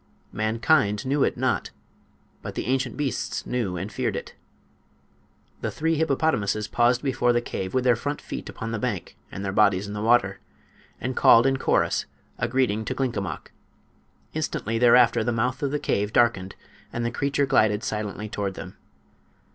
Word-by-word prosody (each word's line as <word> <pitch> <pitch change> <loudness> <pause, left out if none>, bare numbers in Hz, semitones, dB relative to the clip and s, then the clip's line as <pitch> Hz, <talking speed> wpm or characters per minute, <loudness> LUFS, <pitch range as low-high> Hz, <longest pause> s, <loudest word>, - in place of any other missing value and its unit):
Mankind 110 0 +1
knew 140 +2 +2
it - - 0
not, - - 0 0.7
but - - -7
the - - -3
ancient 130 -1 -1
beasts 145 -3 -2
knew 110 -8 -2
and 95 +5 -5
feared - - -2
it. - - -6 1.3
The - - -1
three 160 +2 -1
hippopotamuses 140 -9 0
paused 120 +1 +2
before 125 -3 +2
the 120 - +3
cave, 95 -4 -5
with 130 - +2
their 125 -2 +4
front 145 +5 -3
feet - - -7
upon 115 0 -6
the 115 - -2
bank 105 -8 -3 0.2
and 100 - -5
their 95 - -1
bodies 100 -2 +3
in 100 - -6
the 105 - -4
water, 110 -4 +3 0.6
and 125 0 -3
called 115 +2 +6
in 135 0 +2
chorus - - +1 0.3
a - - 0
greeting 120 -4 +1
to - - -3
Glinkomok. 120 -8 -3 0.8
Instantly 115 -7 -2
thereafter 120 -1 +5
the 120 - 0
mouth 125 +3 -1
of 140 - 0
the 150 - -1
cave 105 -7 -1
darkened 110 -6 +2 0.4
and 120 0 -3
the 120 - -1
creature 140 +2 0
glided 110 -6 +2
silently 105 0 -3
toward 100 -2 -3
them. - - -9
120 Hz, 170 wpm, -25 LUFS, 105-130 Hz, 1.3 s, called